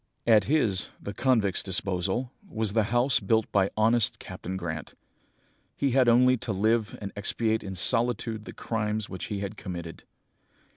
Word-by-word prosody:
"At 110 -3 +5
his, 110 - +2
the 100 - -6
convict's 110 -5 +1
disposal, 95 +5 -2 0.2
was 110 -7 -2
the 110 -2 +3
house 120 +4 +2
built 110 +2 +2
by 100 -1 +3
honest 115 +1 +3
Captain 95 +2 -6
Grant. 80 -5 -5 0.8
He 140 -2 +1
had 125 -1 +4
only 125 +2 +5
to 110 - -4
live 110 +2 +1
and 100 -2 -6
expiate 110 +2 +1
in 95 -1 -6
solitude 115 +1 0
the - - -8
crimes 105 -2 -2
which 95 -1 -5
he 105 -2 -4
had 100 +1 -5
committed. 85 -3 -7
110 Hz, 155 wpm, -27 LUFS, 95-115 Hz, 0.8 s, At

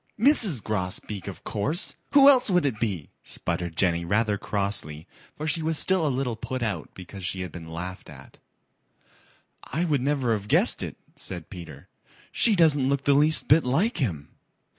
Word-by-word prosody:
"Mrs. 215 - +3
Grosbeak, 100 0 -4
of 100 - -8
course. 145 - -1 0.2
Who 280 -1 +8
else 260 -5 +6
would 180 -4 +2
it 120 -7 -1
be?" 95 -10 -3
sputtered 85 -1 -4
Jenny 85 -3 +1
rather 105 +4 +1
crossly, 100 -7 -3 0.3
for 155 - -5
she 160 +1 +1
was 160 0 0
still 185 -2 +2
a - - +1
little 130 -3 -2
put 130 +2 -5
out 110 -2 -3
because 95 +1 -10
she 95 +1 -2
had 90 - -6
been 80 -2 -10
laughed 90 +3 -7
at. - - -14 1.2
"I 165 +5 -2
would 145 -6 0
never 135 -3 0
have 105 -2 -4
guessed - - +4
it," - - -6 0.2
said 90 -4 -6
Peter. 85 -7 -10 0.4
"She 225 -3 +4
doesn't 150 -6 +3
look 140 -1 0
the 140 - +3
least 150 +3 +4
bit 155 +3 +5
like 165 - 0
him." 85 - -3
115 Hz, 175 wpm, -25 LUFS, 95-155 Hz, 1.2 s, Who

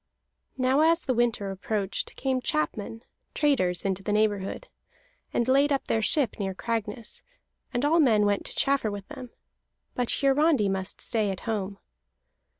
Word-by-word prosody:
Now, 260 +2 +2
as 330 +2 +3
the 260 - +1
winter 230 -5 0
approached, 195 0 -3
came 260 -1 -1
chapmen, 225 -6 -2 0.3
traders, 185 - +1
into 195 0 -1
the 205 - -3
neighborhood, 210 - 0 0.6
and 235 - 0
laid 275 +3 +4
up 275 - 0
their 225 - 0
ship 250 +1 +1
near 195 -2 -2
Cragness; 225 +1 -3 0.5
and 245 +3 0
all 325 +3 +4
men 220 -8 +4
went 205 -1 +1
to - - -7
chaffer 275 -5 +2
with 200 -1 -7
them. 255 -2 -8 0.6
But 245 -1 -1
Hiarandi 275 -5 +3
must 190 0 -3
stay 220 -4 0
at 190 - -4
home. 205 -3 -3
225 Hz, 150 wpm, -27 LUFS, 200-270 Hz, 0.6 s, laid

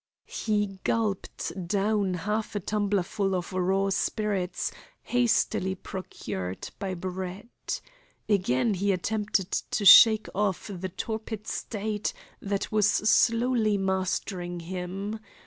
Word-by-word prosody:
He 205 -3 -1
gulped 195 -4 -2
down 200 -1 +1
half 210 +5 -2
a - - +1
tumblerful 200 -1 0
of 180 +1 -4
raw 190 +2 +1
spirits 195 -2 -1 0.3
hastily 225 -6 +1
procured 95 - -6
by 190 -2 -3
Brett. 185 +4 -5 0.5
Again 190 - +2
he 200 +2 +1
attempted 205 0 -1
to 205 - -1
shake 220 +2 +9
off 205 0 -1
the 185 0 -4
torpid 220 +2 -5
state 210 -1 -3 0.3
that 200 0 -2
was 210 -1 +4
slowly 225 +1 +3
mastering 185 -2 -2
him. 190 +5 -4
200 Hz, 105 wpm, -27 LUFS, 185-215 Hz, 0.5 s, shake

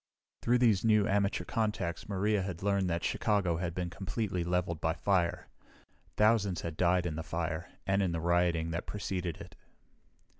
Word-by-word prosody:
Through 120 +1 +3
these 115 -6 +3
new 110 -2 +4
amateur 100 0 +1
contacts 105 -7 -2
Maria 100 +1 +1
had 95 -2 -5
learned 100 -2 +1
that 85 0 -1
Chicago 100 -7 +1
had 85 -1 -3
been 90 -2 -3
completely 95 -1 -2
leveled 90 -2 -1
by 80 - +1
fire. 95 -4 0 0.7
Thousands 105 -4 +3
had 85 -2 -5
died 90 +1 +2
in 80 -3 -3
the - - -2
fire 80 0 -3 0.2
and 95 +1 +2
in 95 -3 +1
the 85 - -2
rioting 85 -1 +1
that 85 +1 -4
preceded 90 -5 -3
it. - - -11
90 Hz, 165 wpm, -31 LUFS, 85-100 Hz, 0.7 s, new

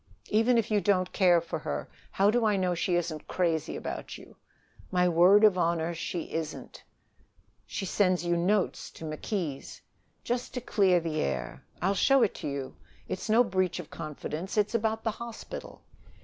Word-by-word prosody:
"Even 225 +3 +3
if 230 -1 0
you 210 -1 +3
don't 185 -3 +1
care 180 -3 +5
for 165 0 -5
her, - - -4 0.2
how 200 +2 +3
do 240 +1 +1
I 215 -2 +3
know 185 -2 +1
she 175 +1 0
isn't 165 -3 -2
crazy 165 -4 0
about - - -6
you?" - - -15 0.5
"My 180 0 +2
word 180 +5 +6
of 200 -4 +6
honor, 170 0 +1
she 170 0 -4
isn't." 160 -1 -5 0.9
"She 195 - -4
sends 185 -2 +1
you 175 0 +2
notes 185 +3 0
to 160 - -9
McKees'." 155 -1 -4 0.4
"Just 245 +1 -3
to - - -1
clear 195 -6 +3
the 160 -2 -2
air, 65 -2 -3 0.2
I'll 195 +2 +3
show 270 +5 +4
it 215 - +1
to - - -3
you. 140 -2 -4 0.3
It's 185 - -4
no 230 +3 +6
breach 185 -5 0
of 170 - -9
confidence. 155 +4 -5
It's 210 +1 +2
about 220 -1 0
the 225 - +1
hospital." 235 +1 -8
185 Hz, 175 wpm, -29 LUFS, 170-210 Hz, 0.9 s, word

